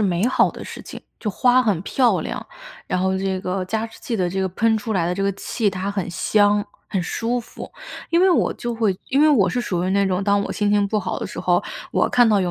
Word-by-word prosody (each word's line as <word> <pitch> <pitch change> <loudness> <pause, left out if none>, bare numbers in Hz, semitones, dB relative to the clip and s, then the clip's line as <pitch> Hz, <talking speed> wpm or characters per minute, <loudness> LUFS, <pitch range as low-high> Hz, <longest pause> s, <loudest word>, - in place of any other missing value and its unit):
美 190 0 +1
好 255 - +3
的 - - -9
事 - - -8
情， - - -9 0.2
就 210 - -2
花 250 +5 +4
很 205 -8 +1
漂 250 +4 +2
亮， - - -5 0.4
然 180 - -1
后 190 0 +1
这 190 -1 -1
个 185 0 -2
加 220 +4 -2
湿 225 - -15
器 240 - -4
的 180 -3 0
这 190 +2 -2
个 190 - 0
喷 225 +4 +2
出 220 +1 -4
来 175 -5 +1
的 175 - -1
这 195 - -2
个 200 0 +1
气， 205 +3 -1
它 190 +1 -3
很 195 -3 -3
香、 205 +4 +2 0.2
很 190 - -2
舒 235 +7 -1
服。 235 - -10 0.4
因 335 +1 +3
为 380 +1 +5
我 345 - +2
就 240 - -4
会 220 -5 +1
因 275 - +2
为 305 - +6
我 230 -11 +4
是 250 - -1
属 180 -7 -2
于 185 - 0
那 200 +1 +2
种 185 0 0
当 200 0 +2
我 - - -4
心 205 -1 0
情 205 -1 +3
不 215 +2 0
好 185 - -3
的 - - -4
时 - - -7
候， - - +2 0.3
我 - - +2
看 245 -2 +4
到 210 -2 +3
有 180 -2 0
205 Hz, 285 characters per minute, -22 LUFS, 190-230 Hz, 0.4 s, 为